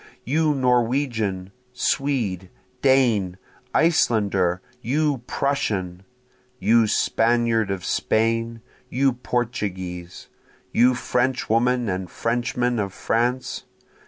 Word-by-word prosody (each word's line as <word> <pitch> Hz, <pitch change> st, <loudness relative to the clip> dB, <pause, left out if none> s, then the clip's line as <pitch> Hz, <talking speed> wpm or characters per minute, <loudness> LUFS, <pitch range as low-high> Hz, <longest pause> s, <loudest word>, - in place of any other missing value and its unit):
You 150 Hz, +3 st, +1 dB
Norwegian! 120 Hz, -6 st, 0 dB, 0.2 s
Swede! 120 Hz, -9 st, -1 dB, 0.3 s
Dane! 115 Hz, -9 st, +3 dB, 0.3 s
Icelander! 100 Hz, -, +2 dB, 0.2 s
you 145 Hz, +2 st, 0 dB
Prussian! 95 Hz, -10 st, -2 dB, 0.5 s
You 115 Hz, -2 st, +3 dB
Spaniard 115 Hz, -1 st, +2 dB
of 95 Hz, -2 st, -3 dB
Spain! 115 Hz, +1 st, 0 dB, 0.3 s
you 135 Hz, +1 st, +2 dB
Portuguese! 95 Hz, -8 st, -4 dB, 0.4 s
You 125 Hz, +1 st, +4 dB
Frenchwoman 125 Hz, -1 st, +1 dB
and 95 Hz, -2 st, -3 dB
Frenchman 120 Hz, +1 st, -1 dB
of 100 Hz, -2 st, -2 dB
France! 125 Hz, +2 st, -1 dB
115 Hz, 80 wpm, -23 LUFS, 100-125 Hz, 0.5 s, You